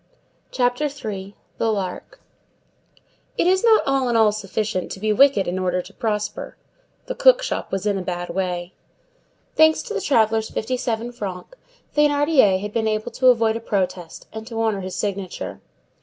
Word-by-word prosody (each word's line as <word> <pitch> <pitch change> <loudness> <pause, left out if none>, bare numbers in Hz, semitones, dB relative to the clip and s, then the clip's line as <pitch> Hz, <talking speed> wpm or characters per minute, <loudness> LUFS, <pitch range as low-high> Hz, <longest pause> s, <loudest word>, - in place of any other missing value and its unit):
CHAPTER 245 +3 0
III—THE 215 -5 -4
LARK 190 -4 -4 1.2
It - - +2
is 375 +3 +3
not 450 -2 +5
all 270 -2 +1
in 235 - +1
all 220 -2 +5
sufficient 205 -1 -3
to - - -9
be 215 +1 +1
wicked 265 -4 +4
in 180 +2 -2
order 180 -1 0
to 180 +3 -8
prosper. 210 -1 -3 0.5
The - - -4
cook - - +5
shop - - -3
was 195 +1 -2
in 200 -2 +1
a - - -4
bad 175 -1 -4
way. 180 -1 -3 0.8
Thanks 315 0 +5
to 455 - -6
the 420 - -2
traveller's 225 - +2
fifty 255 +4 -2
seven 235 -1 -2
francs, 200 - -7 0.4
Thénardier 290 -9 +4
had 210 +1 -6
been 220 -1 0
able 215 +2 -2
to 255 +2 +1
avoid 230 -3 +4
a - - -2
protest 185 -6 -3
and 220 0 -7
to 225 -2 -5
honor 220 -3 0
his 185 0 -6
signature. 200 -3 -4
220 Hz, 170 wpm, -22 LUFS, 195-255 Hz, 1.2 s, not